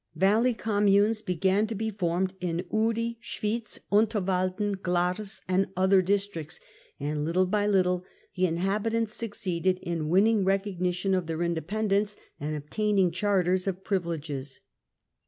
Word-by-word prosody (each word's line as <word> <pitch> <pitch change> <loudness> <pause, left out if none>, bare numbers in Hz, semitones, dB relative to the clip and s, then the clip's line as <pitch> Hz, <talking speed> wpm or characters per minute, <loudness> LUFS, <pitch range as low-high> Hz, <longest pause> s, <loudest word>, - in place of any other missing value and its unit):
Valley 215 +8 +3
communes 205 +1 +2
began 190 +2 +1
to 225 - -4
be 220 +2 -2
formed 185 -1 -1
in 175 0 -2
Uri, 230 +1 0
Schwitz, 220 0 -3
Unterwalden, 200 -2 +1
Glarus 180 +4 -1
and 185 +1 +2
other 190 +1 +5
districts, 190 -4 -1 0.4
and 150 +1 -2
httle 170 +5 +1
by 205 -1 +2
little 180 -3 +2 0.3
the 185 0 +2
inhabitants 210 +6 0
succeeded 185 -5 -1
in 165 -3 -2
winning 205 +4 +4
recognition 190 -1 0
of 185 -3 0
their 165 +1 -2
independence 200 +5 0 0.2
and 150 +1 -3
obtaining 190 +5 +1
charters 185 0 +1
of 190 0 -3
privileges. 155 -8 -3
190 Hz, 125 wpm, -28 LUFS, 175-210 Hz, 0.4 s, other